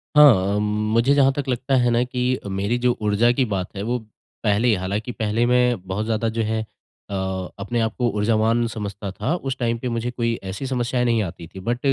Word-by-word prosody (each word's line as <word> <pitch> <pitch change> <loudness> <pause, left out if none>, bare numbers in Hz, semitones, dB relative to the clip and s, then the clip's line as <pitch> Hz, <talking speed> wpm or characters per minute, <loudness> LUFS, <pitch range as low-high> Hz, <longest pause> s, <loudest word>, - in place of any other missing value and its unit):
हाँ, 105 -9 +6
मुझे 105 +5 +2
जहाँ 135 -1 +5
तक 145 -1 -4
लगता 130 +2 0
है 120 -1 +3
ना 120 +1 +3
कि 125 0 -1
मेरी 100 +5 -1
जो 125 -1 +2
ऊर्जा 105 +3 +3
की 130 +1 +1
बात 95 -4 -2
है, 100 - -4
वो 120 +3 0 0.5
पहले 105 +3 +2
ही 115 - +5
हालाँकि 100 +6 -3
पहले 110 +1 0
मैं 125 -1 +3
बहुत 100 +3 -2
ज़्यादा 115 0 0
जो 115 +1 -2
है 110 +1 -1 0.5
अ, - - -6 0.5
अपने 115 +4 -2
आपको 115 +2 0
ऊर्जावान 110 +2 +2
समझता 100 -3 -5
था। 135 - -2
उस 135 -6 -4
टाइम 115 -2 0
पे 125 - -3
मुझे 115 +1 -2
कोई 115 -1 -1
ऐसी 95 +8 -5
समस्याएँ 125 -1 0
नहीं 115 -2 +2
आती 85 -2 -7
थीं, 95 +3 -10
बट 120 +4 -1
115 Hz, 205 wpm, -22 LUFS, 105-125 Hz, 0.5 s, हाँ